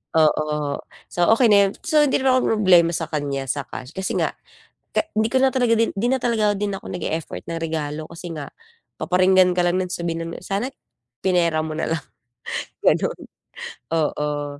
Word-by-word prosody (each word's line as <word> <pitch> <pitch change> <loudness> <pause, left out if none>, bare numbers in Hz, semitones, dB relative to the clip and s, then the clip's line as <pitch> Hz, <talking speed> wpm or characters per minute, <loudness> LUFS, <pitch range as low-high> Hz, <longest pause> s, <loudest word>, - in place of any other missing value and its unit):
Oo, 150 -2 +1 0.3
so 175 -1 +1
okey 235 -3 +4
na 205 - +7
yun. - - -4
So 310 -2 +3
hindi 270 - +1
na 265 - +4
ako - - +4
mamroblema 180 -6 +4
sa - - -3
kanya 140 -2 -2
sa 140 -3 -2
cash 125 +2 -8
kasi 190 +2 -3
nga, - - +1 0.7
ka - - +2
hindi 220 +1 +1
ko 260 - +3
na 265 0 +3
talaga 235 -3 +3
din 230 - +1
'di 225 +5 0
na 265 - +2
talaga 215 -4 +1
din 205 -1 -1
ako - - -7
nag-e-effort 165 -3 -4
ng 165 -1 -4
regalo 155 -1 -3
kasi 170 0 -7
nga, 150 -2 -6 0.5
paparinggan 185 0 +4
ka 180 - +3
lang 175 +1 +2
non, 185 - -2
sabihin 165 -1 -3
nun, - - -8
"Sana 200 +6 -1 0.6
pinera 170 -4 +2
mo 155 - -4
na - - -1
lang," 160 -2 -2 0.8
ganon. - - +2 0.7
Oo. 145 -2 -1
175 Hz, 185 wpm, -22 LUFS, 155-210 Hz, 0.8 s, na